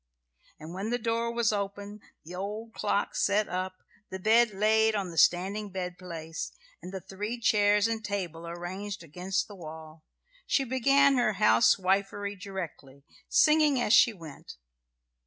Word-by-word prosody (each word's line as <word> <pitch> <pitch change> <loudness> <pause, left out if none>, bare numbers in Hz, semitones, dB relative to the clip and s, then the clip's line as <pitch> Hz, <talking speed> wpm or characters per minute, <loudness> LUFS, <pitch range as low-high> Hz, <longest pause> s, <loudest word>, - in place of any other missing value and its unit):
And 155 +2 -9
when 195 +4 -4
the 240 - 0
door 230 0 -1
was 235 -2 +1
open, 205 +1 -5 0.2
the 175 - -10
old 210 +5 -6
clock 205 -1 -1
set 205 +1 +2
up, 185 0 -4 0.3
the 190 - -5
bed 225 +5 +4
laid 220 +2 +2
on 195 -4 -2
the 165 - -10
standing 195 +6 +2
bedplace, 180 -3 -6 0.3
and 180 - -8
the 190 - -5
three 205 +5 -5
chairs 210 -2 +3
and 225 -1 -3
table 170 -5 -4
ranged 190 +3 -6
against 180 +5 -3
the 210 - -11
wall, 160 -3 -11 0.4
she 275 - +2
began 275 +2 +3
her 240 -3 +2
house 115 - +4
wifery 200 +2 -1
directly, 175 -8 -8 0.3
singing 305 - +4
as 235 -2 +2
she 235 - +7
went. 165 -8 -11
200 Hz, 150 wpm, -28 LUFS, 180-220 Hz, 0.4 s, she